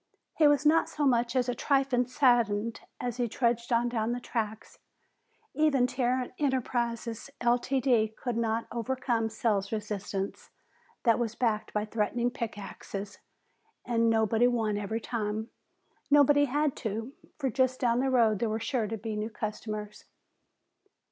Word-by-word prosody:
He 310 Hz, -, +5 dB
was 290 Hz, 0 st, +3 dB
not 320 Hz, +2 st, +4 dB
so 295 Hz, -, -1 dB
much 240 Hz, -2 st, +2 dB
as 255 Hz, -1 st, +2 dB
a 245 Hz, -, 0 dB
trifle 270 Hz, -2 st, +1 dB
saddened 235 Hz, -5 st, +2 dB, 0.2 s
as 245 Hz, -1 st, -3 dB
he 245 Hz, -1 st, 0 dB
trudged 235 Hz, +1 st, 0 dB
on 235 Hz, 0 st, +3 dB
down 235 Hz, -1 st, -1 dB
the 245 Hz, -, -3 dB
tracks. 220 Hz, -3 st, -4 dB, 0.7 s
Even 295 Hz, -5 st, +3 dB
Tarrant 250 Hz, 0 st, -1 dB
Enterprises, 240 Hz, -4 st, -1 dB
Ltd., 240 Hz, -2 st, +2 dB
could 245 Hz, -2 st, -3 dB
not 230 Hz, 0 st, 0 dB
overcome 240 Hz, -1 st, -1 dB
sales 210 Hz, -3 st, 0 dB
resistance 205 Hz, -2 st, -4 dB, 0.5 s
that 230 Hz, -2 st, +4 dB
was 230 Hz, -2 st, -2 dB
backed 220 Hz, -4 st, 0 dB
by 210 Hz, 0 st, -1 dB
threatening 230 Hz, +3 st, 0 dB
pick 230 Hz, -4 st, -4 dB
axes, 200 Hz, 0 st, -7 dB, 0.7 s
and 230 Hz, -1 st, +2 dB
nobody 225 Hz, +1 st, +3 dB
won 225 Hz, -4 st, 0 dB
every 205 Hz, +2 st, -2 dB
time. 220 Hz, 0 st, -3 dB, 0.6 s
Nobody 290 Hz, 0 st, +6 dB
had 290 Hz, +1 st, 0 dB
to, 225 Hz, +4 st, -4 dB, 0.2 s
for 270 Hz, -4 st, -1 dB
just 260 Hz, +1 st, +1 dB
down 240 Hz, -1 st, +2 dB
the 265 Hz, +1 st, +1 dB
road 230 Hz, -5 st, +3 dB
there 230 Hz, -, 0 dB
were 220 Hz, +1 st, -1 dB
sure 230 Hz, -2 st, -1 dB
to 225 Hz, +2 st, -4 dB
be 220 Hz, +1 st, -4 dB
new 210 Hz, +1 st, -2 dB
customers. 215 Hz, -1 st, -5 dB
235 Hz, 150 wpm, -29 LUFS, 220-255 Hz, 0.7 s, Nobody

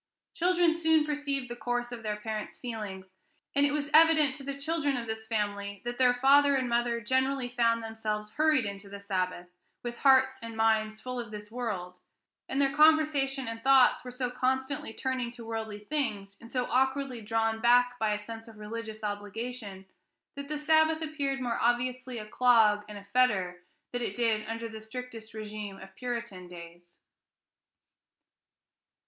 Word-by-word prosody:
Children 350 Hz, -1 st, +3 dB
soon 320 Hz, -2 st, +3 dB
perceive 290 Hz, -3 st, -2 dB
the 240 Hz, -, -6 dB
course 245 Hz, 0 st, -2 dB
of 240 Hz, -2 st, -6 dB
their 215 Hz, -1 st, -2 dB
parents' 215 Hz, 0 st, -5 dB
feelings, 205 Hz, -6 st, -6 dB, 0.4 s
and 280 Hz, 0 st, +4 dB
it -, -, -1 dB
was 295 Hz, 0 st, -2 dB
evident 315 Hz, -3 st, +6 dB
to 285 Hz, -1 st, -8 dB
the 275 Hz, 0 st, -5 dB
children 290 Hz, -2 st, -1 dB
of 235 Hz, -, -4 dB
this 220 Hz, 0 st, -5 dB
family 205 Hz, -2 st, -2 dB
that 240 Hz, +1 st, -4 dB
their 250 Hz, -1 st, +5 dB
father 280 Hz, +2 st, +5 dB
and 260 Hz, -2 st, 0 dB
mother 235 Hz, 0 st, +1 dB
generally 260 Hz, +2 st, +1 dB
found 230 Hz, -2 st, +1 dB
themselves 215 Hz, -1 st, -4 dB
hurried 305 Hz, -2 st, +3 dB
into 200 Hz, 0 st, -6 dB
the 200 Hz, 0 st, -8 dB
Sabbath 185 Hz, -3 st, -3 dB, 0.3 s
with 240 Hz, 0 st, -5 dB
hearts 265 Hz, -1 st, +4 dB
and 230 Hz, -1 st, -7 dB
minds 220 Hz, -1 st, +2 dB
full 250 Hz, +1 st, -5 dB
of 235 Hz, -2 st, -5 dB
this 210 Hz, 0 st, -9 dB
world, 190 Hz, -7 st, -4 dB, 0.5 s
and 270 Hz, -, -1 dB
their 275 Hz, -1 st, +2 dB
conversation 295 Hz, -4 st, +4 dB
and 230 Hz, 0 st, -6 dB
thoughts 270 Hz, -1 st, +5 dB
were 250 Hz, -, -7 dB
so 250 Hz, 0 st, -3 dB
constantly 265 Hz, +2 st, -1 dB
turning 255 Hz, 0 st, -2 dB
to 235 Hz, -1 st, -10 dB
worldly 220 Hz, -2 st, -4 dB
things, 210 Hz, -6 st, -3 dB
and 230 Hz, +1 st, -13 dB
so 250 Hz, -1 st, 0 dB
awkwardly 265 Hz, -1 st, +1 dB
drawn 225 Hz, +1 st, 0 dB
back 245 Hz, +1 st, +4 dB
by 220 Hz, -1 st, +1 dB
a 210 Hz, -, +1 dB
sense 225 Hz, +2 st, -9 dB
of 225 Hz, -1 st, -13 dB
religious 220 Hz, 0 st, -7 dB
obligation, 205 Hz, 0 st, -5 dB, 0.5 s
that 280 Hz, 0 st, -6 dB
the 305 Hz, -, -2 dB
Sabbath 315 Hz, +1 st, +3 dB
appeared 285 Hz, -3 st, -2 dB
more 240 Hz, -3 st, -2 dB
obviously 250 Hz, +1 st, 0 dB
a 215 Hz, -, -6 dB
clog 220 Hz, -3 st, +4 dB
and 210 Hz, -, -7 dB
a 200 Hz, -, -10 dB
fetter 190 Hz, -8 st, +2 dB, 0.3 s
than 245 Hz, -, -2 dB
it 205 Hz, -4 st, -3 dB
did 225 Hz, -3 st, +1 dB
under 230 Hz, +1 st, -4 dB
the 220 Hz, -1 st, -9 dB
strictest 225 Hz, 0 st, -8 dB
régime 210 Hz, -2 st, -6 dB
of 190 Hz, 0 st, -13 dB
Puritan 235 Hz, -7 st, -5 dB
days. 175 Hz, 0 st, -12 dB
240 Hz, 170 wpm, -29 LUFS, 215-265 Hz, 0.5 s, evident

